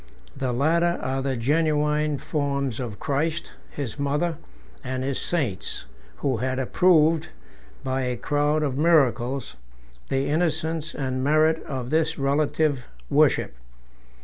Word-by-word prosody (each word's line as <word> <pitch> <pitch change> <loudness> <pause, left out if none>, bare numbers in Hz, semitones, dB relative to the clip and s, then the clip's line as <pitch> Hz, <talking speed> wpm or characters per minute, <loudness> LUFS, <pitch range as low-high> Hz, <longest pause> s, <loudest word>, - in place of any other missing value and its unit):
The 130 -2 -2
latter 170 +7 +2
are 135 +1 -1
the 135 -1 -1
genuine 150 +2 +1
forms 140 -4 -2
of 115 -6 -5
Christ, 155 +4 -1 0.2
his 140 -2 -5
mother, 150 +4 0 0.5
and 130 0 -3
his 135 0 -2
saints, 125 - -2 0.3
who 130 - -1
had 130 +2 -1
approved, 160 +3 +3 0.6
by 130 0 -1
a 125 -1 -2
crowd 150 +3 +1
of 140 -2 -1
miracles, 135 - +2 0.5
the 135 0 +1
innocence 160 0 -1
and 130 -2 -2
merit 155 +3 +3
of 130 -3 -4
this 160 0 +1
relative 140 -1 +1 0.2
worship. - - +3
145 Hz, 120 wpm, -25 LUFS, 130-155 Hz, 0.6 s, approved